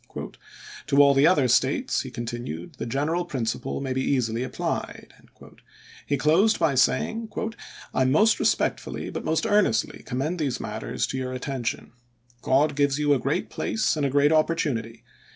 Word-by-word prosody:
" -, -, -15 dB
To 140 Hz, -1 st, +1 dB
all 140 Hz, -1 st, +7 dB
the 140 Hz, +3 st, +5 dB
other 150 Hz, -8 st, +4 dB
States," -, -, +1 dB
he -, -, -7 dB
continued, 120 Hz, -8 st, -6 dB
"the -, -, -3 dB
general 150 Hz, +8 st, -1 dB
principle 130 Hz, -10 st, -3 dB
may 135 Hz, -1 st, -2 dB
be 130 Hz, -, -1 dB
easily 120 Hz, -4 st, 0 dB
applied." 130 Hz, -, -4 dB, 0.9 s
He 145 Hz, -, +1 dB
closed 170 Hz, -, +3 dB
by 165 Hz, -4 st, +2 dB
saying: 220 Hz, -, +1 dB, 0.6 s
"I 130 Hz, -, +2 dB
most 160 Hz, +13 st, +4 dB
respectfully, -, -, -1 dB
but -, -, -5 dB
most 160 Hz, 0 st, 0 dB
earnestly, 210 Hz, +2 st, +1 dB
commend 145 Hz, +7 st, -3 dB
these 140 Hz, -5 st, -1 dB
matters -, -, -3 dB
to 130 Hz, -, -4 dB
your 130 Hz, 0 st, -4 dB
attention. 130 Hz, -2 st, -4 dB, 0.5 s
God 140 Hz, +4 st, +2 dB
gives 140 Hz, -1 st, +2 dB
you 145 Hz, -1 st, +3 dB
a 135 Hz, -, +1 dB
great 135 Hz, +4 st, -2 dB
place 220 Hz, -5 st, 0 dB
and 150 Hz, -, -2 dB
a 140 Hz, -, +2 dB
great 145 Hz, +2 st, +3 dB
opportunity. 140 Hz, -8 st, 0 dB
140 Hz, 160 wpm, -25 LUFS, 130-155 Hz, 0.9 s, all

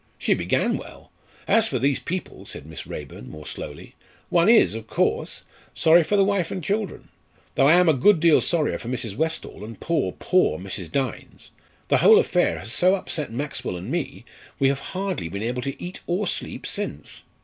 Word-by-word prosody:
She -, -, +2 dB
began -, -, 0 dB
well. -, -, -12 dB, 0.4 s
As 225 Hz, -1 st, +4 dB
for 130 Hz, -, -1 dB
these 135 Hz, +2 st, +1 dB
people," 185 Hz, +2 st, -5 dB
said -, -, -9 dB
Miss 80 Hz, -1 st, -9 dB
Raeburn, 70 Hz, -3 st, -8 dB
more 75 Hz, +4 st, -10 dB
slowly, -, -, -7 dB, 0.4 s
"one 170 Hz, +3 st, +4 dB
is, 230 Hz, -, +6 dB
of 110 Hz, 0 st, -7 dB
course, -, -, -1 dB, 0.3 s
sorry 165 Hz, +1 st, +6 dB
for 205 Hz, -, 0 dB
the 195 Hz, -, +5 dB
wife 195 Hz, -4 st, 0 dB
and 185 Hz, -, -5 dB
children, 205 Hz, +4 st, -3 dB, 0.4 s
though 135 Hz, -, +4 dB
I 155 Hz, -, +7 dB
am 180 Hz, 0 st, +5 dB
a 160 Hz, -, +6 dB
good 165 Hz, +7 st, +4 dB
deal 165 Hz, -1 st, +5 dB
sorrier 165 Hz, -4 st, 0 dB
for -, -, -8 dB
Mrs. 120 Hz, -5 st, -4 dB
Westall, 160 Hz, -6 st, -3 dB
and 115 Hz, +2 st, -9 dB
poor, 155 Hz, -, 0 dB
poor 185 Hz, 0 st, +2 dB
Mrs. 95 Hz, -2 st, -6 dB
Dynes. 135 Hz, -4 st, -4 dB, 0.4 s
The -, -, +4 dB
whole -, -, +7 dB
affair -, -, +2 dB
has 110 Hz, +5 st, -5 dB
so 185 Hz, +7 st, +4 dB
upset 155 Hz, -8 st, -3 dB
Maxwell 135 Hz, -7 st, -4 dB
and 95 Hz, +8 st, -7 dB
me, 160 Hz, -7 st, -3 dB, 0.3 s
we 135 Hz, -, +3 dB
have 140 Hz, 0 st, -1 dB, 0.2 s
hardly 190 Hz, -, -2 dB
been 100 Hz, +4 st, -5 dB
able 125 Hz, +2 st, -2 dB
to 135 Hz, +2 st, -5 dB
eat 180 Hz, +1 st, -7 dB
or 180 Hz, +4 st, 0 dB
sleep -, -, -3 dB
since. 75 Hz, -, -4 dB
145 Hz, 195 wpm, -24 LUFS, 115-180 Hz, 0.4 s, I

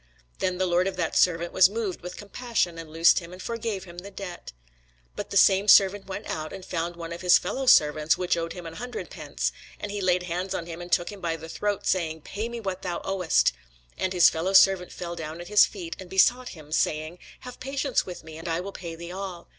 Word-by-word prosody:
Then 185 Hz, -1 st, 0 dB
the 185 Hz, -, +1 dB
lord 180 Hz, +1 st, +2 dB
of 195 Hz, -, -3 dB
that 170 Hz, -3 st, -2 dB
servant 170 Hz, -1 st, +2 dB
was 185 Hz, 0 st, +6 dB
moved 210 Hz, -3 st, -3 dB
with 180 Hz, +1 st, -8 dB
compassion, 205 Hz, -5 st, -2 dB
and 165 Hz, -1 st, -8 dB
loosed 165 Hz, +2 st, +5 dB
him, 170 Hz, -1 st, -11 dB
and 180 Hz, -, -10 dB
forgave 225 Hz, -2 st, -4 dB
him 175 Hz, -1 st, -10 dB
the 195 Hz, +3 st, -9 dB
debt. 190 Hz, -3 st, -8 dB, 0.6 s
But -, -, -5 dB
the -, -, 0 dB
same 195 Hz, +1 st, +5 dB
servant 195 Hz, -1 st, +6 dB
went 195 Hz, +2 st, -6 dB
out, 155 Hz, 0 st, -4 dB
and 190 Hz, -1 st, -8 dB
found 170 Hz, 0 st, -3 dB
one 170 Hz, 0 st, -6 dB
of 170 Hz, -, -8 dB
his 180 Hz, -1 st, +6 dB
fellowservants, 155 Hz, -, +3 dB
which 180 Hz, -1 st, +1 dB
owed 165 Hz, 0 st, -3 dB
him 180 Hz, -2 st, -9 dB
an 165 Hz, -, -7 dB
hundred 245 Hz, 0 st, -6 dB
pence: -, -, -3 dB, 0.3 s
and 210 Hz, -, -5 dB
he 205 Hz, 0 st, -3 dB
laid 180 Hz, -1 st, +2 dB
hands 180 Hz, +2 st, -3 dB
on 170 Hz, -, -3 dB
him, 170 Hz, 0 st, -7 dB
and 175 Hz, 0 st, -9 dB
took 175 Hz, -, +2 dB
him 200 Hz, -2 st, -11 dB
by 165 Hz, -1 st, -1 dB
the 160 Hz, 0 st, -9 dB
throat, 205 Hz, +4 st, -2 dB
saying, 160 Hz, -4 st, 0 dB
Pay 215 Hz, +9 st, -5 dB
me 235 Hz, 0 st, -5 dB
that 190 Hz, -2 st, -4 dB
thou 175 Hz, -2 st, -3 dB
owest. 190 Hz, -4 st, +2 dB, 0.4 s
And 185 Hz, -, -1 dB
his 180 Hz, -2 st, +6 dB
fellowservant 190 Hz, +2 st, +4 dB
fell 175 Hz, -1 st, -6 dB
down 160 Hz, 0 st, -6 dB
at 175 Hz, +1 st, -8 dB
his 210 Hz, 0 st, +6 dB
feet, 175 Hz, -5 st, -7 dB
and 185 Hz, -2 st, -9 dB
besought 245 Hz, +7 st, +3 dB
him, 150 Hz, -1 st, -14 dB
saying, 155 Hz, +2 st, -1 dB, 0.2 s
Have 250 Hz, 0 st, -10 dB
patience 270 Hz, 0 st, -1 dB
with 180 Hz, -3 st, -8 dB
me, 160 Hz, 0 st, -10 dB
and 165 Hz, -, -8 dB
I 165 Hz, +1 st, 0 dB
will 195 Hz, +3 st, -5 dB
pay 170 Hz, -4 st, -7 dB
thee 170 Hz, +1 st, -8 dB
all. 185 Hz, -2 st, -7 dB
180 Hz, 235 wpm, -26 LUFS, 170-195 Hz, 0.6 s, was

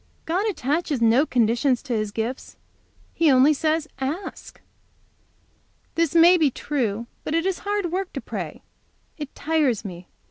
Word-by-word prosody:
God 375 Hz, +7 st, 0 dB
attaches 300 Hz, -, -1 dB
no 235 Hz, +6 st, +4 dB
conditions 240 Hz, +2 st, +2 dB
to 250 Hz, -, -3 dB
His 215 Hz, -2 st, -1 dB
gifts. 225 Hz, +5 st, -5 dB, 0.6 s
He 330 Hz, -2 st, +3 dB
only 270 Hz, +3 st, +6 dB
says, 315 Hz, +1 st, 0 dB
'Ask!'" 295 Hz, +9 st, -5 dB, 1.3 s
"This 335 Hz, -1 st, 0 dB
may 345 Hz, +2 st, +7 dB
be 305 Hz, -3 st, +4 dB
true, 235 Hz, -5 st, -2 dB, 0.2 s
but 310 Hz, -, -2 dB
it 330 Hz, +1 st, +1 dB
is 380 Hz, -2 st, -1 dB
hard 405 Hz, -4 st, -2 dB
work 375 Hz, +1 st, -2 dB
to -, -, -4 dB
pray. -, -, -6 dB, 0.6 s
It 295 Hz, -2 st, -7 dB
tires 290 Hz, -9 st, 0 dB
me. 175 Hz, -2 st, -8 dB
295 Hz, 145 wpm, -24 LUFS, 240-330 Hz, 1.3 s, may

